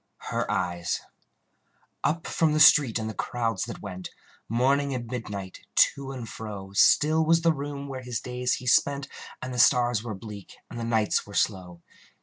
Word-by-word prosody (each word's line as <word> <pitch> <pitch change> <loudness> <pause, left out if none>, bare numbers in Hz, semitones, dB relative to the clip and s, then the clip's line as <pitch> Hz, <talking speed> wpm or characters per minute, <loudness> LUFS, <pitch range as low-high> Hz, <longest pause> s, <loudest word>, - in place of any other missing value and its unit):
Her - - -1
Eyes 85 -1 -1 1.0
Up 165 +1 0
from 160 -2 +1
the 155 - +1
street 140 -6 +7
and 110 -1 -3
the 110 - -4
crowds 115 -3 -2
that - - -8
went, 90 0 -7 0.4
Morning 135 +4 +1
and 120 -1 -4
midnight, 105 -6 -6 0.2
to 140 -1 +3
and 125 -4 -7
fro, 100 -4 -8
Still 155 +10 +4
was 165 +1 +3
the 165 -1 +4
room 140 -1 -6
where 130 -2 -6
his 125 -2 -4
days 125 +1 -2
he 125 - -4
spent, 140 +2 +2 0.4
And 130 0 -5
the 125 - -3
stars 120 -2 +4
were 110 -2 -5
bleak, 100 -1 -10
and 120 - -6
the - - -4
nights 110 -3 +1
were 100 - -10
slow. 90 -4 -1
120 Hz, 175 wpm, -26 LUFS, 105-140 Hz, 1.0 s, street